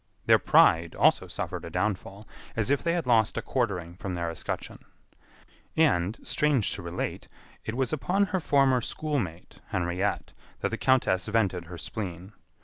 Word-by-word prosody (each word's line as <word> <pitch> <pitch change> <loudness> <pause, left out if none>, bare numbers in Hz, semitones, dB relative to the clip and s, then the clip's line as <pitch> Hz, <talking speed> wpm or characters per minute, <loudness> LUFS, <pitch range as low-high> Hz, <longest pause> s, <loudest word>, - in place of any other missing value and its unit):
Their - - +6
pride 85 0 +4
also - - +3
suffered - - -5
a - - -6
downfall, 100 0 -3 0.3
as 115 +3 +1
if 140 - +2
they 170 - +1
had 175 -1 -1
lost 115 -3 +3
a - - 0
quartering 95 -10 -1
from 95 0 -5
their 85 -1 -2
escutcheon. 80 - -5 1.0
And, 110 - +3
strange 145 -8 +1
to 100 - -6
relate, 85 0 -4 0.4
it 110 - -3
was 130 0 0
upon 185 +7 +1
her 185 - +2
former 135 -5 +3
schoolmate, 115 - -4
Henriette, 90 +2 -2 0.3
that - - +1
the - - -3
countess 120 -8 +2
vented 100 -6 0
her 90 +1 -9
spleen. 90 +3 -6
105 Hz, 155 wpm, -28 LUFS, 90-130 Hz, 1.0 s, Their